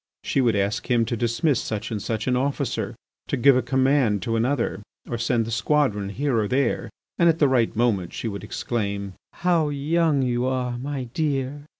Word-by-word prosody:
She 135 - +1
would 120 -4 +2
ask 100 +1 -1
him 120 -2 +3
to 120 - -2
dismiss 120 +4 +1
such 110 +1 -4
and 105 -2 -3
such 110 +1 -2
an 125 - +1
officer, 135 +3 -1 0.3
to 140 - -1
give 135 +2 +6
a 130 - +3
command 130 -7 +2
to 115 +1 -1
another, 120 -1 0 0.2
to 120 - -4
send 115 -1 +1
the 115 - -5
squadron 115 -5 +1
here 125 +3 0
or 105 - 0
there. 130 +2 0 0.3
And 170 - +6
at 165 - +2
the 150 - +4
right 125 -4 +2
moment 110 -6 +1
she - - -4
would 100 -3 -5
exclaim: 100 -3 -3 0.2
"How 170 -4 +1
young 145 0 +1
you 125 0 0
are, 125 -2 -1
my 135 0 -3
dear!" 140 +1 -2
125 Hz, 195 wpm, -24 LUFS, 115-140 Hz, 0.3 s, give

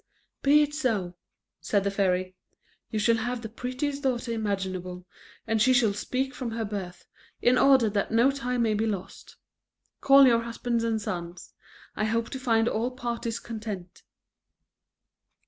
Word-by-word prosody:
"Be 295 +2 +5
it 295 0 -3
so," 220 -12 -1 0.5
said 195 +5 0
the 200 - 0
fairy; 185 -2 0 0.5
"you 220 - -3
shall 230 +2 +3
have 240 +1 -3
the - - -4
prettiest 255 +5 -3
daughter 255 -3 -1
imaginable, 190 -4 -3 0.4
and 220 -1 0
she 255 +4 +5
shall 235 -5 +3
speak 260 +6 -2
from 255 -4 -4
her 225 -1 -2
birth, 190 -4 -6 0.3
in 245 - +4
order 265 -3 +5
that 200 -1 -1
no 235 +4 +4
time 250 -3 -1
may 220 -2 +2
be 215 +2 0
lost. 200 -4 -6 0.6
Call 275 0 +7
your 235 -2 +4
husband 235 0 -2
and 225 -1 0
sons; 175 -3 -6 0.4
I 215 - 0
hope 230 +1 -1
to 265 - -4
find 230 -3 +2
all 235 +1 0
parties 235 -2 -4
content." 210 -6 -7
230 Hz, 155 wpm, -27 LUFS, 200-250 Hz, 0.6 s, Call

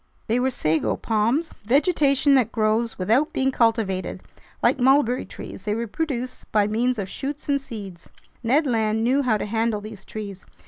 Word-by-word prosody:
They 235 +2 +1
were 260 +1 +2
sago 160 -10 0
palms, 230 +9 0
vegetation 280 - +3
that 255 -5 +3
grows 220 +1 0
without 230 +11 +2
being 265 0 +1
cultivated; 225 -6 0 0.4
like - - +3
mulberry 260 -1 +3
trees, - - -9
they 210 0 0
reproduce 255 +2 -3
by 210 -2 +1
means 235 +4 0
of 200 -3 -3
shoots 285 +8 -6
and 280 -1 +1
seeds. 200 -9 -9 0.3
Ned 265 +7 +2
Land 220 -3 +1
knew 260 +4 +3
how 240 -5 +2
to - - -3
handle 225 0 0
these 210 -2 -10
trees. 200 -3 -7
230 Hz, 165 wpm, -23 LUFS, 215-270 Hz, 0.4 s, vegetation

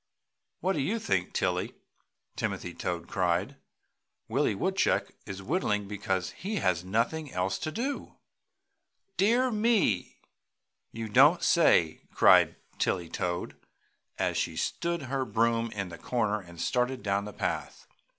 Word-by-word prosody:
"What 190 +3 +1
do 155 - -2
you 200 +12 0
think, 95 - -1
Tilly?" - - -1 0.6
Timothy - - -3
Toad 85 -1 -4
cried, 95 +8 0 0.7
"Willie - - +1
Woodchuck - - +1 0.2
is, 100 0 -6
whittling 105 - 0
because 95 -3 -2
he 205 +4 -5
has 90 - +1
nothing 115 +10 -1
else 90 +1 -1
to 155 - -3
do!" 265 - -4 1.0
"Dear 240 +6 +3
me! 210 - +1 0.7
You 115 -1 -5
don't 145 +10 +5
say 85 - +4
so!" - - -29
cried - - +6 0.2
Tilly 85 -3 0
Toad, 90 +1 -3 0.6
as - - 0
she - - -1
stood 170 -2 -1
her 135 +1 -1
broom 115 -1 +1
in 100 -4 -4
the 85 -1 -10
corner 110 -4 0
and 85 -2 -13
started 125 +4 0
down 100 0 0
the 105 - -6
path. - - -3
115 Hz, 135 wpm, -29 LUFS, -, 1.0 s, cried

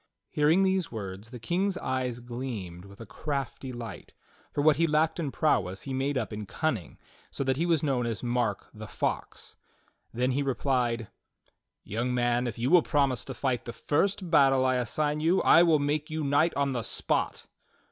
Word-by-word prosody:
Hearing 155 +6 +3
these 190 -3 +1
words, 100 -1 -6
the 125 - -8
King's 180 - -1
eyes 125 -2 -2
gleamed 115 -8 -6
with 100 0 -14
a 115 - -8
crafty 135 +3 -4
light, 120 -2 -8 0.4
for 145 - -1
what 155 -2 +5
he 165 +1 +3
lacked 155 +2 +1
in 155 -4 -1
prowess 100 - 0
he 135 - -5
made 135 +1 0
up 115 -3 -3
in 105 -1 -6
cunning, 125 - -2 0.3
so - - -3
that 130 -1 0
he 170 +3 0
was 165 -3 +2
known 130 -5 0
as 115 -1 -4
Mark 120 -4 -1
the 110 0 -9
Fox. - - -4 0.5
Then 125 +2 0
he 135 +3 0
replied: 125 -4 0 0.7
"Young 120 +4 -2
man, 120 0 +1
if 115 - -5
you 120 +5 0
will 180 -1 +7
promise 135 -5 +1
to 135 - -6
fight 125 -1 -1
the 120 - -6
first 185 - 0
battle 135 -4 +5
I 130 -1 +2
assign 150 +5 -1
you, 165 +5 +3
I 165 - +7
will 165 -3 +5
make 145 +1 -1
you 155 0 -3
knight 145 +4 +2
on 140 -1 +1
the 125 -2 -1
spot." - - -1
130 Hz, 190 wpm, -28 LUFS, 120-150 Hz, 0.7 s, will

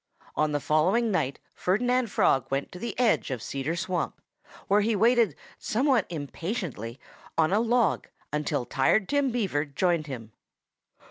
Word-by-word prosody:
On 155 0 +1
the 145 - 0
following 185 - +2
night 140 -8 0 0.2
Ferdinand 245 +6 +1
Frog 135 -8 +2
went 135 +1 -2
to 180 - -9
the 235 - -5
edge 240 -9 +2
of 130 -3 -2
Cedar 140 +7 -3
Swamp, 175 +1 -2 0.5
where 205 +2 +4
he 220 +1 +1
waited 225 - +4 0.2
somewhat 255 -2 +2
impatiently 155 - -4 0.4
on 160 +2 +3
a 210 - +4
log 235 -3 +2 0.3
until 150 -4 -1
Tired 160 - +2
Tim 285 -2 +2
Beaver 200 - 0
joined 155 +2 0
him. 115 -5 -7
180 Hz, 145 wpm, -27 LUFS, 145-230 Hz, 0.5 s, where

